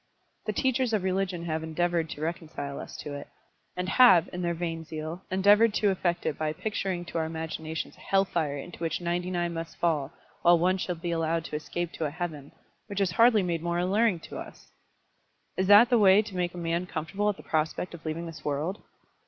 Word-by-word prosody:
The - - +2
teachers 260 -2 +1
of 210 -4 +1
religion 185 -2 -1
have 160 -1 -1
endeavoured 165 0 0
to 150 - -7
reconcile 155 -4 -4
us - - -8
to 145 - -6
it, 145 0 -7 0.5
and 180 0 -2
have, 190 -6 +6
in 180 - -3
their 170 -1 0
vain 165 -1 -3
zeal, 160 +2 -6
endeavoured 205 +4 +5
to 205 -2 +3
effect 175 -2 -1
it 150 - -2
by 155 -1 0
picturing 190 -1 -3
to 170 -1 -3
our 160 - 0
imaginations 160 0 -5
a - - -20
hell 195 0 +2
fire 155 -6 -1
into 170 +5 -9
which 165 -1 -1
ninety 175 +1 -2
nine 175 -1 -1
must 165 0 -6
fall; 155 -4 0 0.3
while 175 0 +6
one 185 +3 +2
shall 180 -1 -2
be 170 +1 -4
allowed 165 0 0
to - - -5
escape 170 +2 -3
to 160 - -3
a - - 0
heaven, 155 -3 -5 0.4
which 200 -1 -4
is 195 -3 +2
hardly 225 +2 +5
made 170 -2 -1
more 170 0 -1
alluring 190 +2 +2
to - - -8
us! - - -11 0.8
Is 185 0 0
that 210 +5 +8
the 240 - +5
way 200 +1 +6
to 205 -3 -9
make 180 -1 -1
a - - -7
man 170 +1 -1
comfortable 180 +6 -1
at 205 - -2
the - - -12
prospect 160 +3 -1
of 170 -1 -10
leaving 160 +2 -3
this 155 -2 -9
world? 150 +7 -2
175 Hz, 215 wpm, -28 LUFS, 160-190 Hz, 0.8 s, that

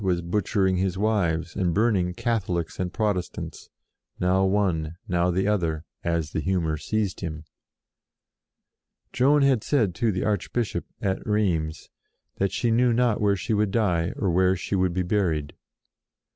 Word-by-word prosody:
was 90 -2 0
butchering 95 +1 +1
his 95 0 0
wives 90 -6 0
and 90 -3 0
burning 100 -5 +2
Catholics 90 -8 -2
and 90 -1 -2
Protestants, 100 -3 -3 0.5
now 95 +1 +2
one, 90 -5 0
now 90 0 +1
the 95 +3 +1
other, 85 -6 0 0.2
as 85 -3 -1
the - - -2
humour 85 -3 0
seized 100 +6 -2
him. 80 -2 -5 1.7
Joan 140 +3 +4
had 130 -5 +3
said 115 -11 +1
to 115 +5 +1
the 95 - -2
Archbishop, 110 +2 -1 0.2
at 95 -1 -1
Rheims, 85 -8 -1 0.5
that 100 0 0
she 120 - 0
knew 120 +2 +3
not 120 -2 +2
where 100 -1 +3
she 110 +5 -2
would 105 -1 +2
die, 90 -6 +1
or 95 -4 0
where 95 +2 +3
she 95 +2 -5
would 95 -2 +1
be 90 - +1
buried. 85 -7 0
95 Hz, 150 wpm, -25 LUFS, 85-105 Hz, 1.7 s, Joan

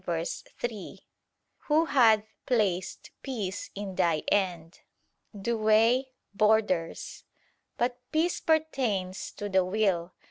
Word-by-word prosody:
147:3): 185 +5 -4 0.7
"Who 310 +2 +4
hath 230 -8 +5 0.2
placed 200 -7 0
peace 215 -8 -4
in 200 -1 -5
thy 165 -4 +1
end 175 -4 -1 0.6
[Douay: 225 +4 +3 0.3
'borders']". 210 -5 +1 0.5
But 245 +1 0
peace 325 +3 +1
pertains 255 - 0
to 205 - -5
the 190 -2 +3
will. 185 -3 0
210 Hz, 95 wpm, -28 LUFS, 185-240 Hz, 0.7 s, hath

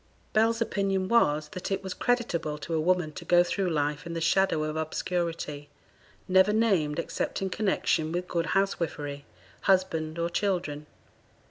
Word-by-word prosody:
Bell's 225 +1 +3
opinion 195 -4 0
was, 155 -10 +3
that 185 - -6
it 195 0 -2
was 190 -1 -4
creditable 200 -11 -1
to 165 +3 -6
a 160 - +2
woman 175 -1 +1
to - - -9
go 175 0 +5
through 185 +1 -1
life 150 0 -1
in 170 - -5
the - - -1
shadow 165 -1 +2
of 155 0 -3
obscurity, 160 -2 -3 0.6
never 190 +2 +5
named 195 -10 +2
except 165 0 -2
in 190 -1 -2
connexion 180 -6 0
with 175 +1 -2
good 170 -1 -1
housewifery, 150 -7 -2 0.4
husband, 170 -4 +1
or 170 0 0
children. 170 -7 -1
175 Hz, 155 wpm, -28 LUFS, 155-195 Hz, 0.6 s, go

